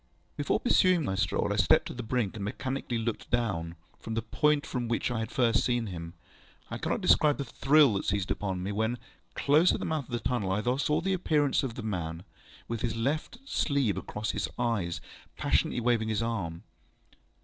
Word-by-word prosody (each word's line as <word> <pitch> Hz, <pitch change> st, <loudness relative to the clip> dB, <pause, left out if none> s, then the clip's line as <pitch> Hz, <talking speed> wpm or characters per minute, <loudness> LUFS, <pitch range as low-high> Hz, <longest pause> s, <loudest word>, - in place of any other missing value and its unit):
Before 145 Hz, -, 0 dB
pursuing 185 Hz, -, +3 dB
my 95 Hz, -, -1 dB
stroll, 95 Hz, -2 st, 0 dB
I -, -, -2 dB
stepped -, -, +4 dB
to -, -, -5 dB
the 125 Hz, -, -5 dB
brink, 115 Hz, -3 st, -1 dB
and 105 Hz, -, -5 dB
mechanically 130 Hz, +3 st, -3 dB
looked 115 Hz, 0 st, -3 dB
down, 85 Hz, -9 st, -1 dB, 0.2 s
from 110 Hz, -, -5 dB
the 115 Hz, -, -1 dB
point 150 Hz, +6 st, +2 dB
from 125 Hz, -5 st, -3 dB
which 115 Hz, +1 st, 0 dB
I 120 Hz, -, -1 dB
had 110 Hz, 0 st, -3 dB
first 120 Hz, -3 st, +2 dB
seen 120 Hz, -2 st, +1 dB
him. 85 Hz, -3 st, -7 dB, 0.6 s
I -, -, -4 dB
cannot -, -, -1 dB
describe 150 Hz, -1 st, +4 dB
the 140 Hz, -, -3 dB
thrill 140 Hz, -3 st, +4 dB
that 100 Hz, -, -2 dB
seized 100 Hz, -1 st, -1 dB
upon 95 Hz, -3 st, -2 dB
me, 100 Hz, -, -2 dB
when, 110 Hz, +4 st, 0 dB, 0.4 s
close 155 Hz, +5 st, +4 dB
at -, -, -2 dB
the -, -, -3 dB
mouth 155 Hz, -4 st, -1 dB
of -, -, -16 dB
the 120 Hz, -, -1 dB
tunnel, 105 Hz, -5 st, -1 dB
I 105 Hz, +2 st, -1 dB
saw 150 Hz, +1 st, +1 dB
the 195 Hz, +2 st, 0 dB
appearance 150 Hz, -6 st, +2 dB
of 125 Hz, -4 st, -4 dB
a 125 Hz, -, -5 dB
man, 85 Hz, -5 st, -3 dB, 0.4 s
with 115 Hz, -1 st, -3 dB
his 115 Hz, -2 st, -1 dB
left 145 Hz, -, -2 dB
sleeve 140 Hz, -, +1 dB
across 105 Hz, +3 st, -3 dB
his -, -, -2 dB
eyes, 100 Hz, -8 st, -1 dB, 0.4 s
passionately -, -, +1 dB
waving 115 Hz, -2 st, +1 dB
his 110 Hz, +1 st, 0 dB
right 115 Hz, -, 0 dB
arm. 85 Hz, -7 st, -4 dB
115 Hz, 205 wpm, -29 LUFS, 100-140 Hz, 0.6 s, stepped